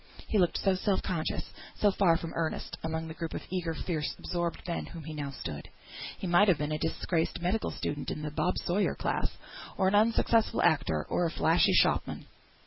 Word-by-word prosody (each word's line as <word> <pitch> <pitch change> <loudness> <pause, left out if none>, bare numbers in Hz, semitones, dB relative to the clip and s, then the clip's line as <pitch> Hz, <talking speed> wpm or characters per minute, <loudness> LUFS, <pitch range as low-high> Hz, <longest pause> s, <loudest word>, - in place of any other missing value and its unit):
He 215 - +1
looked 175 -2 +3
so 195 - +2
self 190 +1 0
conscious, 165 -4 -2 0.2
so 205 - +3
far 180 -4 +4
from 165 -1 -6
earnest, 165 -1 -2
among 160 0 -2
the 160 - -6
group 165 0 -5
of - - -4
eager, 175 -3 -1
fierce, 155 -3 -2
absorbed 175 -1 -3
men, 170 - -1
among - - -8
whom 165 -2 -7
he 155 +1 -6
now 145 -2 -4
stood. 135 - -6 0.5
He - - -6
might 180 +4 +5
have 180 -5 +5
been 150 0 -2
a 155 - -1
disgraced 165 +1 -1
medical 180 +6 0
student 145 -1 -3
of - - -3
the 150 - -3
Bob 180 +4 0
Sawyer 195 +4 +1
class, - - -1 0.5
or 190 - +3
an - - -2
unsuccessful 225 +1 +3
actor, 80 - +2
or 175 - +1
a - - -2
flashy 165 +1 +3
shopman. - - +2
170 Hz, 205 wpm, -30 LUFS, 160-185 Hz, 0.5 s, might